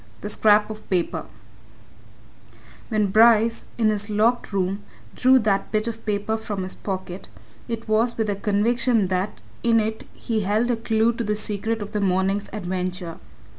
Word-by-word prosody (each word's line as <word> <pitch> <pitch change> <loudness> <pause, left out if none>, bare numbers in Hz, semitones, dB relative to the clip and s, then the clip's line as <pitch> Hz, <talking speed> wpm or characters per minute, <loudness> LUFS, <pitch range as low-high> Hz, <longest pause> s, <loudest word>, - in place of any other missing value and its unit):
THE 205 - -4
SCRAP 210 0 +3
OF 215 0 -10
PAPER 180 -3 -1 1.6
When 210 -4 +1
Bryce, 230 +1 +4
in 225 -2 +3
his 205 0 -3
locked 220 +4 +1
room, 195 0 -1 0.3
drew 260 +1 +5
that 205 -5 0
bit 215 0 +1
of 230 -1 -5
paper 210 +1 0
from 205 -3 -4
his 185 - -6
pocket, 190 -1 -6 0.4
it 230 -1 -5
was 225 +2 +1
with 220 - +1
the 205 -1 -1
conviction 215 +1 +1
that 185 +2 -2 0.2
in 230 -1 +4
it 220 0 -3
he 225 -2 -2
held 215 +4 +1
a - - +2
clue 225 0 +1
to 235 0 -3
the 210 -1 0
secret 215 +1 -1
of 205 - -9
the 210 - -1
morning's 195 +1 +1
adventure. 180 -3 -4
215 Hz, 165 wpm, -23 LUFS, 195-225 Hz, 1.6 s, drew